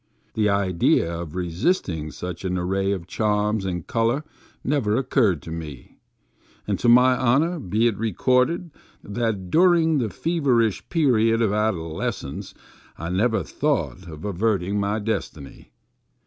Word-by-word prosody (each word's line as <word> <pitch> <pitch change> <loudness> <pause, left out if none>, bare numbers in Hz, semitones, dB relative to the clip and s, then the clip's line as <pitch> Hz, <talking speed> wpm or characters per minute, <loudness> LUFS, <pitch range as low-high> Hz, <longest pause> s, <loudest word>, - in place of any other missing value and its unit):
The 105 -1 +1
idea 90 -4 +2
of 80 -2 -8
resisting 90 - -1
such 90 +5 -7
an 90 -1 -1
array 95 +2 0
of 95 -4 -3
charms 105 +1 0
and 90 -3 -3
color 115 +5 0 0.4
never 130 -7 +1
occurred 120 - +1
to 80 - -8
me, 75 -6 -8 0.7
and - - -1
to 120 - +2
my 125 +2 +6
honor 140 +8 +2
be 110 -1 0
it 115 -3 +2
recorded, 125 - +1 0.3
that 105 -4 -3
during 165 -3 +4
the 115 -4 -1
feverish 125 - 0
period 115 -9 +3
of 110 -4 +2
adoles 95 -7 -1
cence - - -8 0.4
I 85 +2 -5
never 110 +5 +1
thought 140 - -2
of 80 0 -9
averting 100 0 0
my 100 +1 0
destiny. 100 -10 -5
105 Hz, 135 wpm, -23 LUFS, 90-125 Hz, 0.7 s, my